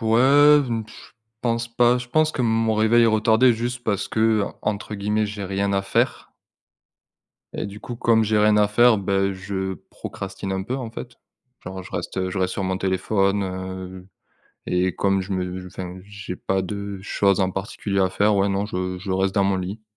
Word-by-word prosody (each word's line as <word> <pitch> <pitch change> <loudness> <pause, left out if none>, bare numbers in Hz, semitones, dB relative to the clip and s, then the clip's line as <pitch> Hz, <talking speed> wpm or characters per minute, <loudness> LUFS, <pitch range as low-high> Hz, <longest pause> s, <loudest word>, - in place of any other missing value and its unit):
ouais 135 +6 +6
je 115 -2 -2 0.7
pense 115 0 -1
pas, 120 +1 +3
je 125 - -8
pense 155 +4 +2
que 130 - -1
mon 115 -1 +2
réveil 110 +2 +4
est - - +5
retardé 110 +3 +4
juste 120 +2 -3
parce 100 -3 -1
que, 110 - -2 0.2
heu, - - +1 0.2
entre 105 0 -3
guillemets, 105 +1 0
«j'ai 100 -1 -5
rien 100 +1 -1
à 100 0 +1
faire». 100 - 0 1.3
Et - - -4
du 100 +1 -9
coup, 120 - -6
comme 115 -1 +3
j'ai 110 0 +2
rien 105 0 +4
à 105 - +5
faire, 120 +1 +5
bah, 95 0 0
je 95 0 -4 0.2
procrastine 95 0 -6
un 95 0 -2
peu, 125 +7 -3
en 125 -4 -5
fait. 120 +1 -8 0.5
Genre, 95 +1 -6
je - - -12
reste, - - -4
heu, 95 0 -1
je 95 - -3
reste 95 0 0
sur 100 - -3
mon 95 0 -1
téléphone, 95 +1 +1
heu 95 0 -6 0.6
et 90 +1 0
comme 95 -1 +1
je 95 +2 -6
me 90 0 -3
enfin, 90 0 -7
j'ai 100 -2 -7
pas 95 0 -1
de 100 0 -5
choses 100 0 +1
en 95 -1 +2
particulier 100 +1 -3
à 95 -1 +2
faire, 100 +2 +2
ouais, 100 +1 +2
non, 100 +1 0
je 90 -2 -3
je 95 +1 -6
reste 95 +1 0
dans 100 - +3
mon 95 -1 +2
lit. 95 +4 -5
100 Hz, 200 wpm, -23 LUFS, 95-110 Hz, 1.3 s, ouais